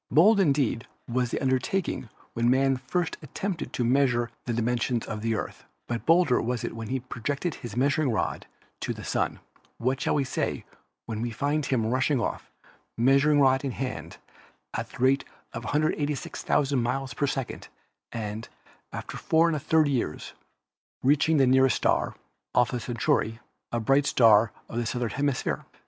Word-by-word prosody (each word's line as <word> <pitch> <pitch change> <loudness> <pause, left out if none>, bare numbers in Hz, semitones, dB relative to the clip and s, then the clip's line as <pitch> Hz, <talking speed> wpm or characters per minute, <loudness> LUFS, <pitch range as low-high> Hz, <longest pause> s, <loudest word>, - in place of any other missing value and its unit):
Bold 200 - +6
indeed 140 - +2 0.2
was 125 0 0
the - - -2
undertaking 130 - -1 0.2
when 115 +1 +2
man 135 +1 +3
first 135 +7 -2
attempted 170 +4 -4
to 125 - 0
measure 120 -2 +2
the 120 - -1
dimensions 120 0 0
of 110 -2 -5
the 115 0 0
Earth, - - -5 0.2
but 120 -1 -4
bolder 165 -6 +4
was 120 -1 -2
it - - -4
when 115 -1 -6
he 130 +3 -1
projected 140 +7 -3
his 120 -3 -8
measuring 140 +2 +2
rod 110 - -2 0.3
to - - -3
the - - -9
Sun. - - -1 0.4
What 130 +3 -1
shall - - +1
we 145 - +2
say 130 - -2 0.4
when 110 -1 -4
we 120 - -1
find 145 +6 -1
him 120 -5 +1
rushing 130 +4 +1
off, - - -3 0.5
measuring 140 +5 +4
rod 130 -1 +4
in 140 - -1
hand, 130 -1 -5 0.6
at - - -3
the - - -12
rate 135 +2 +3 0.3
of 120 - -6
186,000 145 -2 0
miles 130 +2 -2
a 145 - +3
second, 135 -2 -4 0.4
and, 110 -1 -5 0.4
after - - -6
4% 160 -1 +3
years, 125 - -2 0.7
reaching 150 +4 +4
the 135 - +5
nearest 130 +1 +4
star, - - +1 0.4
Alpha 125 0 +3
Centauri, 115 -1 0 0.3
a 120 - 0
bright 135 +5 +3
star 110 -2 +5 0.2
of 115 - -6
the 120 -1 -1
southern 120 -1 -2
hemisphere? 140 0 -1
130 Hz, 160 wpm, -27 LUFS, 120-145 Hz, 0.7 s, Bold